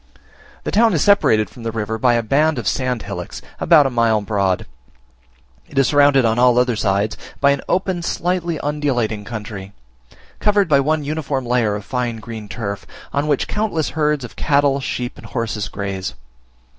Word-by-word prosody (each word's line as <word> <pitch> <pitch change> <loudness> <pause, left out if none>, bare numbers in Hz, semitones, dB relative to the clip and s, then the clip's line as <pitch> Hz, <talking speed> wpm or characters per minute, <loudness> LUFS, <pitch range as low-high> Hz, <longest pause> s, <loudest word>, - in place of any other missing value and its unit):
The - - -3
town 225 -2 +4
is 150 - +2
separated 110 - +4
from 120 - -14
the 115 0 -3
river 110 0 -3
by 120 0 +3
a 115 - +1
band 150 +6 +2
of 115 -4 -3
sand 125 -4 -1
hillocks, 95 -3 -6 0.2
about 160 -4 +5
a 135 - 0
mile 115 -2 +2
broad: 100 -3 0 1.0
it 145 - -11
is 135 -2 +4
surrounded, 145 -3 +5
on 115 +1 +2
all 125 -1 +5
other 125 -1 +3
sides, 105 0 0 0.2
by 140 0 +4
an 140 - 0
open 185 -1 0
slightly 175 -1 -1
undulating 130 -8 -1
country, 105 -3 -7 0.7
covered 205 -2 +3
by 145 -3 +4
one 155 +2 +1
uniform 145 -3 -2
layer 120 -4 +1
of 105 -1 -6
fine 125 -4 -2
green 110 -2 -8
turf, 100 -4 -5 0.3
on 145 +1 0
which 145 -3 +1
countless 205 -8 -1
herds 150 -3 0
of 115 - -12
cattle, 140 -1 +2
sheep, 125 -2 -4
and - - -11
horses 110 -4 -3
graze. 100 -4 -4
125 Hz, 175 wpm, -20 LUFS, 110-150 Hz, 1.0 s, about